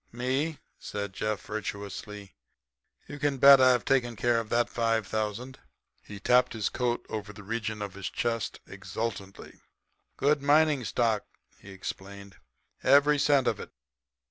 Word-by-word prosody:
"Me?" 130 +6 -1 0.2
said 100 -2 -5
Jeff, 110 +1 -2
virtuously. 100 -1 -6 0.7
"You 145 - -8
can 145 -2 0
bet 140 0 +8
I've 130 -1 +4
taken 125 -4 +1
care 120 +2 +1
of 115 -2 -6
that 120 0 +2
five 115 -2 0
thousand." 110 +5 -4 0.4
He 100 -1 -10
tapped 125 +4 +3
his 110 -3 -1
coat 120 -1 -2
over 105 -1 -5
the 105 0 -12
region 110 0 -3
of 100 -2 -6
his 95 -2 -5
chest 115 -2 -3
exultantly. 100 -4 -6 0.6
"Gold 145 +1 +2
mining 145 -2 +3
stock," 110 0 0 0.3
he 100 - -14
explained, 100 +1 -8 0.4
"every 145 +2 +5
cent 140 -2 +3
of - - 0
it. - - -8
115 Hz, 145 wpm, -28 LUFS, 105-130 Hz, 0.7 s, bet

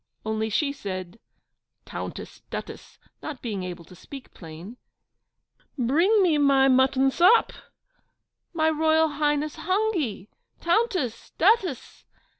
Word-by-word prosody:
(Only 220 0 -1
she 280 +6 0
said 185 -4 -7 0.7
'Tountess, - - -8
Duttess,' - - -8 0.2
not 300 -4 -7
being 210 -5 -3
able 175 -2 -7
to 185 - -16
speak 270 +8 -12
plain) 170 +7 -11 1.0
'bring 335 - +3
me 320 -5 +2
my 275 -2 +4
mutton 265 +1 +3
sop; 370 - +4 1.0
my 320 -2 +1
Royal 315 +1 +2
Highness 295 0 -1
hungy! 365 - -1 0.3
Tountess! 350 - -1
Duttess! 375 - +1
285 Hz, 105 wpm, -25 LUFS, 220-330 Hz, 1.0 s, my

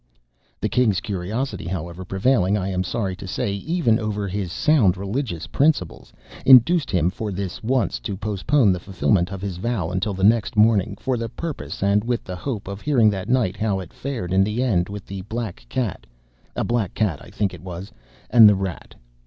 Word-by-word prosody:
The - - 0
king's 110 -7 +2
curiosity, 105 +1 -3
however, 85 0 -5
prevailing, 95 +1 +2
I 95 -1 -2
am 95 -1 -1
sorry 95 0 -2
to 95 - -8
say, 100 +2 -2
even 120 - +1
over 105 -2 -2
his 95 -2 -3
sound 115 - +3
religious 100 - -3
principles, 140 - 0 0.3
induced 135 +5 +6
him 90 -1 +1
for 105 +1 -4
this 95 -1 -5
once 125 +2 0
to 100 -3 -5
postpone 105 +3 +2
the 90 - -3
fulfilment 95 0 0
of 100 -1 -6
his 95 -3 -4
vow 95 -4 -2
until 95 +2 -1
next 105 +3 +2
morning, 105 -3 +3
for 130 -2 -1
the 115 0 -3
purpose 155 -5 -5
and 100 +1 +3
with 120 0 -1
the 90 - -6
hope 105 +1 -5
of 100 +1 -6
hearing 120 -8 +4
that 95 +2 -5
night 120 -7 +2
how 105 -3 -1
it 90 -3 -9
fared 120 -10 -4
in 95 +1 +5
the 105 +5 -1
end 95 -8 +1
with 100 -1 -7
the 95 -1 -6
black 110 - -5
cat 110 - -3 0.5
(a - - -1
black 115 -6 -1
cat, 100 -9 0
I - - -13
think 100 -3 -1
it - - -10
was) 90 +1 -8 0.4
and 115 -3 +9
the 105 - +4
rat. 95 -3 -5
100 Hz, 195 wpm, -22 LUFS, 95-115 Hz, 0.5 s, and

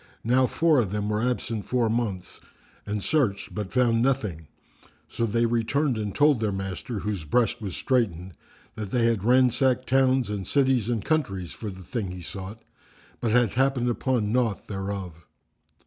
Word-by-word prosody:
Now, 125 +3 +3
four 160 -1 +3
of 110 -6 0
them 105 +1 -2
were 105 0 0
absent 120 -3 -2
four 125 -2 +1
months, 110 -5 -3 0.5
and 105 -1 -2
searched 130 -11 0
but 105 -3 -4
found 120 -2 +3
nothing; 105 - -1 0.6
so 115 - -2
they 115 +2 +1
returned 120 +4 +1
and 105 -2 -4
told 145 -4 +4
their 110 -2 0
master, 95 +4 -4
whose 100 -3 -3
breast 115 +8 +1
was 100 -4 -5
straitened, 95 -8 0 0.4
that 105 -2 -6
they 120 +2 +1
had 115 -4 +1
ransacked 130 +1 +3
towns 130 -1 +3
and 100 -3 -4
cities 130 -5 +2
and 115 -4 -1
countries 100 - -1
for 110 - -6
the 95 -1 -10
thing 110 -1 -3
he 90 -1 -8
sought, 100 +5 -8 0.6
but 115 - -1
had 120 -1 +3
happened 130 -1 +1
upon 120 -3 0
naught 115 -4 0
thereof. 95 -4 -5
115 Hz, 165 wpm, -26 LUFS, 100-125 Hz, 0.6 s, told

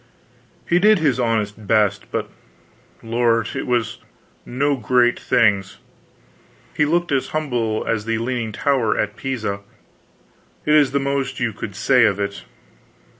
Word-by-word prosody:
He 175 - +3
did 210 +2 +5
his 145 -7 +1
honest 110 -3 -1
best, 105 -2 +1
but - - -2 0.8
lord, 115 0 +1
it - - -4
was 120 -2 -1 0.5
no 140 +3 0
great 120 0 +2
things. 100 -4 +1 1.0
He 150 - +2
looked 170 +2 0
as 135 -2 +1
humble 120 -8 -2
as 110 -2 -1
the 115 0 -1
leaning 115 -1 -2
tower 125 -1 0
at 105 0 -1
Pisa. 115 -7 -3 1.1
It 150 - +2
is 150 -3 +5
the 140 - 0
most 140 -1 -2
you 120 -3 -1
could 100 -1 -7
say 125 +3 +4
of 100 -2 +1
it. 100 0 -4
120 Hz, 140 wpm, -21 LUFS, 110-140 Hz, 1.1 s, did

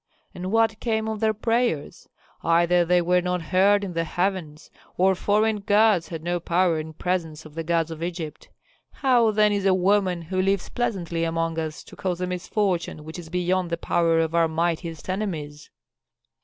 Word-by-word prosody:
And 185 +1 -5
what 225 -1 +2
came 220 -2 -1
of 220 -1 -3
their 220 0 +2
prayers? 225 -7 -1 0.3
Either 170 +1 +3
they 175 +1 +2
were 180 +1 +3
not 180 0 -1
heard 195 +5 +3
in 190 -3 -4
the 165 0 0
heavens, 175 -3 -3 0.3
or 190 +1 +4
foreign 210 +3 +1
gods 205 -3 +3
had 160 -2 -7
no 175 +1 -1
power 170 -1 +1
in 160 0 -7
presence 165 -2 -3
of 155 - -12
the 165 +1 -4
gods 165 0 0
of 160 0 -7
Egypt. 165 -3 -5 0.4
How 245 -4 +3
then 210 0 +3
is 200 -1 0
a 190 - +4
woman 185 -2 +1
who 185 +3 -1
lives 195 0 0
pleasantly 175 -8 -2
among 165 0 -1
us 155 -1 -5
to - - -14
cause 180 -2 -3
a 180 - -1
misfortune 180 -3 -2
which 160 +3 -8
is 165 -2 -10
beyond 180 +1 0
the 170 - -1
power 165 -1 +1
of 165 0 0
our 170 -1 +3
mightiest 165 0 -2
enemies?" 165 -7 -4
180 Hz, 185 wpm, -24 LUFS, 165-200 Hz, 0.4 s, or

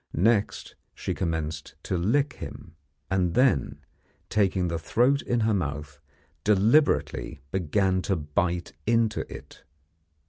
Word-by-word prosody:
Next 105 +3 +1 0.2
she - - -3
commenced 80 -3 -3
to - - -2
lick 125 +11 +1
him, - - -9 0.4
and 90 -3 +1
then, 125 - +2 0.5
taking 95 -3 +2
the 85 -1 -2
throat 125 - +2
in 120 -1 0
her 110 0 +2
mouth, 75 -5 -3 0.4
deliberately 105 - +2
began 95 +1 +1
to 95 - +3
bite 85 +1 -1
into 115 -1 +1
it! - - -11
95 Hz, 115 wpm, -26 LUFS, 85-110 Hz, 0.5 s, to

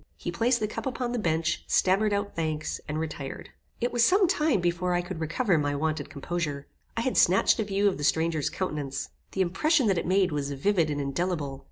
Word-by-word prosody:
He - - -4
placed 240 +1 +2
the 215 - 0
cup 215 - -5
upon 250 -2 -2
the 245 - -1
bench, 160 -4 0
stammered 195 +3 +3
out 205 0 -2
thanks, 155 -2 -2
and 155 +1 -2
retired. 150 -4 -6 0.3
It 240 +1 -1
was 240 -1 +3
some 380 - +5
time 305 - +2
before 175 +1 0
I 175 - +2
could 175 -2 -6
recover 165 +3 +1
my 145 -1 0
wonted 155 +2 -2
composure. 145 -2 -3 0.3
I - - +1
had 255 +2 -1
snatched 190 +5 +4
a - - +2
view 200 0 +1
of 190 - 0
the - - -4
stranger's 160 0 +1
countenance. 145 -6 -3 0.2
The 190 - 0
impression 265 - +2
that 195 -5 +2
it - - -4
made 190 -1 +3
was 145 -1 -2
vivid 165 +3 +1
and 145 -1 -2
indelible. 145 -1 -2
175 Hz, 210 wpm, -27 LUFS, 155-210 Hz, 0.3 s, some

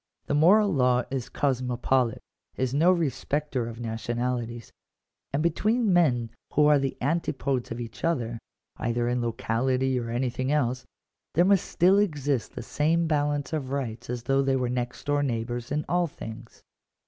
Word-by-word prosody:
The - - -2
moral 195 +7 +5
law 125 -3 +3
is 130 -3 -3
cosmopolite 125 -2 0 0.2
— - - -42
is 130 0 -1
no 165 +6 +5
respecter 145 -5 -1
of 115 0 -8
nationalities: 120 0 -3 0.6
and 140 +3 0
between 210 +6 +2
men 125 -10 +2 0.2
who 150 - +4
are 150 -1 +5
the 135 -1 -2
antipodes 140 -3 -1
of 115 - -5
each 115 -1 -8
other, 120 -9 -1 0.4
either 120 +1 -1
in 120 0 0
locality 125 +2 0
or 115 -1 -5
anything 125 +2 -1
else, 130 -4 0 0.5
there 175 +3 +5
must 195 -1 +4
still 185 +4 +4
exist 145 - -1
the - - -5
same 165 +3 +1
balance 145 0 0
of 145 -4 -2
rights 125 -5 -4
as 120 -1 -3
though 135 +2 +2
they 135 -1 +1
were 125 -2 0
next 125 0 -3
door 145 0 +1
neighbours 120 -2 -3
in 150 +1 -1
all 175 0 +1
things. 115 -4 -10
130 Hz, 160 wpm, -27 LUFS, 120-150 Hz, 0.6 s, moral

